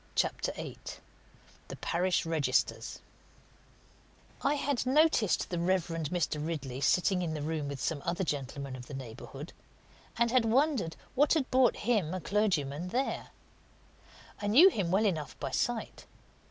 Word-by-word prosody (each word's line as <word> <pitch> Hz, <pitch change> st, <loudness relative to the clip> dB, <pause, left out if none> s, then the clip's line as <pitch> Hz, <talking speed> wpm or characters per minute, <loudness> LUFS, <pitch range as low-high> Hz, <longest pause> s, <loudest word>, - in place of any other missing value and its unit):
CHAPTER -, -, 0 dB
VIII -, -, -7 dB, 0.9 s
THE -, -, -7 dB
PARISH 180 Hz, +1 st, 0 dB
REGISTERS 150 Hz, -6 st, 0 dB, 1.4 s
I 285 Hz, +2 st, +2 dB
had 280 Hz, -3 st, -1 dB
noticed 275 Hz, -, +3 dB
the 175 Hz, -, -1 dB
Reverend 170 Hz, -3 st, 0 dB
Mr. 155 Hz, -3 st, -1 dB
Ridley 145 Hz, -5 st, -4 dB
sitting 180 Hz, +6 st, +3 dB
in 160 Hz, -3 st, -2 dB
the 150 Hz, -, -4 dB
room 155 Hz, -1 st, -2 dB
with 140 Hz, -1 st, -5 dB
some 150 Hz, +2 st, -2 dB
other 175 Hz, +2 st, -1 dB
gentlemen 140 Hz, -3 st, -4 dB
of 125 Hz, -1 st, -10 dB
the 145 Hz, -, -7 dB
neighbourhood, 135 Hz, +4 st, -8 dB, 0.6 s
and 235 Hz, 0 st, +2 dB
had 255 Hz, -1 st, +4 dB
wondered 245 Hz, -, +2 dB, 0.2 s
what 285 Hz, +4 st, +4 dB
had 280 Hz, -5 st, 0 dB
brought 255 Hz, -2 st, +4 dB
him, 200 Hz, -8 st, +1 dB
a -, -, -2 dB
clergyman, 175 Hz, -5 st, 0 dB
there. 255 Hz, +8 st, -2 dB, 1.1 s
I 205 Hz, -, -2 dB
knew 290 Hz, -, +8 dB
him 195 Hz, -, -2 dB
well 195 Hz, +5 st, +3 dB
enough 155 Hz, -8 st, -2 dB
by -, -, -3 dB
sight. -, -, -2 dB
175 Hz, 145 wpm, -31 LUFS, 150-230 Hz, 1.4 s, knew